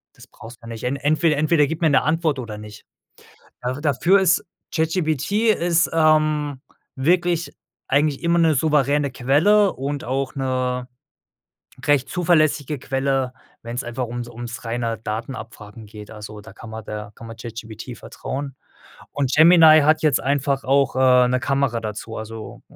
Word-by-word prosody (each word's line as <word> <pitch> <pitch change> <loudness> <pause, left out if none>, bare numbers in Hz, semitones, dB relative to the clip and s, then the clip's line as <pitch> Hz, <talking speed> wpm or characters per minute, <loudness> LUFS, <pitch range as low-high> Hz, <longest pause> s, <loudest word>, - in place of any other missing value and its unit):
Das - - -15
brauchst 115 +2 -13
du - - -54
ja - - -9
nicht. 115 -1 -8
En 125 +2 0
entweder 150 +2 +1
entweder 150 0 +3
gib 160 +3 -5
mir 160 - +4
'ne 135 - +4
Antwort 155 -1 0
oder 110 -4 -6
nicht. 105 0 -11 0.8
Da 125 +1 -2
dafür 160 +6 +3
ist 180 -2 +2 0.3
ChatGPT 165 - +1
ist, 170 -1 +1
ähm, 155 -3 +2 0.4
wirklich 170 +4 +1 0.4
eigentlich 145 +1 +1
immer 170 0 +2
'ne 165 -2 +4
souveräne 145 -1 +1
Quelle 165 +11 +3
und 140 +1 -4
auch 135 +2 -2
'ne 130 -1 -2 1.0
recht 145 -3 +2
zuverlässige 155 -4 +1
Quelle, 135 -1 -1 0.3
wenn's 120 +2 -4
einfach 120 +2 -3
ums 120 +1 -5
ums 120 0 -8
reine 115 -1 -2
Datenabfragen 110 -1 -7
geht. 105 0 -12
Also, 105 -1 -9
da 110 +2 -13
kann 120 - -11
man 110 0 -7
der 105 -1 -7
kann 115 - -12
man 115 0 -10
ChatGPT 115 0 -8
vertrauen. 135 0 -6 0.6
Und 140 -2 -1
Gemini 160 -1 +7
hat 155 +2 +3
jetzt 150 -4 +3
einfach 140 0 0
auch, 135 0 +2
äh, 125 -1 +5
'ne 125 +1 0
Kamera 135 -4 0
dazu. 110 +1 -6
Also, 110 0 -8
135 Hz, 155 wpm, -21 LUFS, 120-155 Hz, 1.0 s, Gemini